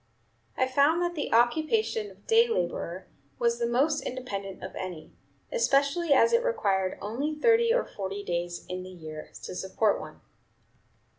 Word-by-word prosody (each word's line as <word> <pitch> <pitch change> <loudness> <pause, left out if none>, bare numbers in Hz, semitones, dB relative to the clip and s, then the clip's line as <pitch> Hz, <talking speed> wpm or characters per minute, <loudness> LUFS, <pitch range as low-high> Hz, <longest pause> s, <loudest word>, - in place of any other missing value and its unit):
I 260 - +3
found 280 +5 +3
that 350 0 -1
the 300 -4 -3
occupation 320 - +2
of - - -19
day 460 +1 +5
laborer 175 - -2 0.3
was 235 0 +1
the 235 - +1
most 285 +6 +2
independent 200 -7 -5
of - - -6
any, 180 -4 -7 0.4
especially 310 - +2
as 370 - +5
it 470 +1 +4
required 195 - 0
only 270 +9 -2
thirty 460 +7 +4
or - - +2
forty 200 0 -5
days 175 -1 -3
in 180 0 -4
the 185 - -9
year 155 -4 -9
to - - -6
support 195 +3 0
one." - - -10
245 Hz, 155 wpm, -28 LUFS, -, 0.4 s, day